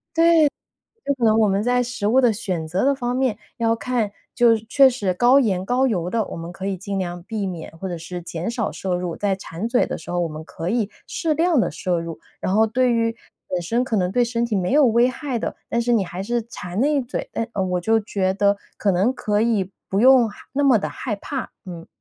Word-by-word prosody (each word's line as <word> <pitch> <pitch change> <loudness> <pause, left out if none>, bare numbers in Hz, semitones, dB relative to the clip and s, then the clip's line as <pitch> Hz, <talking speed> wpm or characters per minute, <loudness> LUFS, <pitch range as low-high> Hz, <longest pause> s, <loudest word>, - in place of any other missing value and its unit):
对， 330 -2 +5 0.7
可 245 - -1
能 220 0 +4
我 215 -2 +4
们 195 +1 +1
在 245 +1 +2
食 245 -4 -3
物 250 +5 +4
的 245 -3 +4
选 185 -6 -3
择 180 +7 0
的 280 +1 +3
方 245 -2 -2
面 255 -5 0 0.2
要 230 -1 +2
看， 230 -3 -1 0.2
就 235 -2 +5
确 235 +5 +4
实 205 -7 -1
高 245 +8 +5
盐 190 -7 0
高 250 +5 +2
油 180 -7 -1
的， 230 +2 +1
我 - - -7
们 165 +1 -7
可 190 +2 -6
以 195 -1 -1
尽 195 +2 -4
量 175 -2 -4
避 210 +1 -3
免 175 -4 -6
或 190 - -4
者 175 - -4
是 175 +2 -7
减 170 +2 -4
少 235 -3 -2
摄 185 -2 -3
入， 175 -1 -3
在 200 -2 0
馋 190 +1 -6
嘴 245 +1 +2
的 - - -4
时 160 - -10
候， 175 0 0
我 170 - 0
们 155 0 -8
可 165 +1 -6
以 220 -2 0 0.2
适 325 -2 -1
量 330 0 +2
地 - - 0
摄 180 -3 -1
入。 165 -1 -6 0.2
然 185 - -1
后 220 +1 +5
对 245 +2 +2
于 230 0 0 0.3
本 180 -1 -2
身 230 +8 0
可 250 -3 -1
能 180 -1 0
对 245 - +3
身 235 0 0
体 235 -2 -2
没 185 +1 0
有 295 +1 +6
危 235 +2 +4
害 260 -1 -3
的， - - -4
但 235 - 0
是 240 +1 +1
你 215 -4 +3
还 180 +1 -6
是 235 +3 -1
馋 185 -5 -7
那 295 +3 +3
一 285 - +2
嘴， 245 -1 -5
但 230 - -2 0.2
我 180 -1 0
就 225 +5 +3
觉 190 -3 -1
得 200 0 +2 0.2
可 205 - +1
能 195 +7 +2
可 210 -4 0
以 215 -5 +1 0.2
不 195 - 0
用 255 -1 +6
害 205 - -12 0.2
那 285 +1 0
么 265 -5 +5
地 - - -3
害 220 -5 -4
怕， 265 +6 -5
嗯。 170 -3 -9
220 Hz, 265 characters per minute, -22 LUFS, 185-245 Hz, 0.7 s, 有